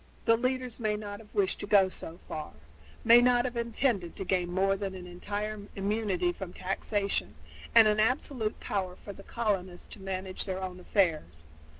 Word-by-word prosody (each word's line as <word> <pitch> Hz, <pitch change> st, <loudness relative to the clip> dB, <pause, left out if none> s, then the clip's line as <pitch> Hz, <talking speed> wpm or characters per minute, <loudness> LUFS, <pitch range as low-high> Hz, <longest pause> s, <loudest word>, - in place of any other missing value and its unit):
The 230 Hz, -, +6 dB
leaders 255 Hz, 0 st, -2 dB
may 215 Hz, -2 st, 0 dB
not 205 Hz, -1 st, -6 dB
have 215 Hz, -2 st, -16 dB
wished 195 Hz, -2 st, +1 dB
to -, -, -5 dB
go 200 Hz, -2 st, +6 dB
so 170 Hz, -2 st, -6 dB
far 155 Hz, -1 st, -6 dB, 0.5 s
may 235 Hz, +1 st, +8 dB
not 245 Hz, 0 st, +4 dB
have 250 Hz, -1 st, -3 dB
intended 230 Hz, -6 st, 0 dB
to 195 Hz, -, -5 dB
gain 180 Hz, -2 st, 0 dB
more 195 Hz, +2 st, +2 dB
than 195 Hz, -1 st, -4 dB
an 180 Hz, -1 st, -8 dB
entire 205 Hz, +4 st, -4 dB
immunity 195 Hz, -3 st, 0 dB
from 185 Hz, -2 st, -7 dB
taxation 195 Hz, -, -1 dB, 0.4 s
and 220 Hz, -, +9 dB
an 210 Hz, 0 st, +2 dB
absolute 225 Hz, -1 st, 0 dB
power 185 Hz, -3 st, -2 dB
for 200 Hz, -, -9 dB
the 195 Hz, -, -12 dB
colonists 195 Hz, -5 st, -2 dB
to 200 Hz, -, -8 dB
manage 190 Hz, -1 st, -3 dB
their 190 Hz, -1 st, -3 dB
own 185 Hz, -1 st, -5 dB
affairs. 155 Hz, -, 0 dB
200 Hz, 180 wpm, -30 LUFS, 185-220 Hz, 0.5 s, and